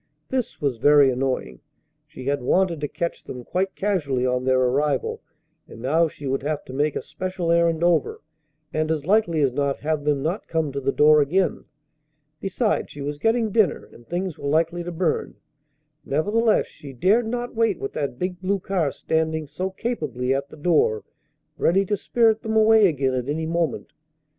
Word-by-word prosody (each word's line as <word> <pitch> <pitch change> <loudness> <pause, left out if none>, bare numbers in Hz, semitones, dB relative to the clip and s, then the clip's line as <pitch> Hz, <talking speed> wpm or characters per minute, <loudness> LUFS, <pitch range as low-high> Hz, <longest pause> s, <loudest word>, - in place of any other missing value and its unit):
This 255 -2 -2
was 140 -5 -1
very 145 +2 +5
annoying. 130 +1 -2 0.5
She 150 -4 -10
had 140 +1 -1
wanted 170 +4 +1
to 145 - -1
catch 170 +3 -4
them 125 -1 -8
quite 190 +7 -2
casually 150 -11 0
on 125 0 0
their 130 0 +3
arrival, 135 +2 0 0.5
and - - -12
now 155 +7 +2
she 145 -2 -10
would 135 0 -1
have 150 +2 -3
to 130 - -9
make 145 +2 0
a - - -3
special 185 -2 -3
errand 170 -1 +2
over, 170 -4 +2 0.5
and 155 0 0
as 155 -3 -1
likely 180 -5 +2
as 135 - +2
not 140 +1 -1
have 155 -1 -1
them 145 -2 0
not 175 +7 -2
come 160 -3 -1
to 140 +1 -4
the 135 +1 +1
door 150 +1 +5
again. 180 +7 0 0.7
Besides, 210 +3 -1
she 145 - -9
was 145 +1 -4
getting 225 +1 +1
dinner, 210 -6 +2
and 120 - -17
things 180 -1 -3
were 140 - -3
likely 165 +3 +1
to 175 - -5
burn. 170 -1 -1 0.7
Nevertheless, 210 +10 +2
she 140 -2 -12
dared 210 - +2
not 245 +1 -3
wait 225 0 +1
with 410 0 -5
that 140 -4 -3
big 180 +3 -4
blue 195 +2 +1
car 180 -6 -1
standing 160 +1 -1
so 180 +6 -4
capably 150 - -2
at 140 +1 -2
the - - -13
door, 150 -9 +2 0.6
ready 195 +3 +3
to 205 - 0
spirit 225 +2 +2
them 220 -1 -3
away 220 -1 +6
again 135 -5 0
at 125 +1 -2
any 160 +2 -1
moment. 165 0 -2
160 Hz, 185 wpm, -23 LUFS, 140-190 Hz, 0.7 s, away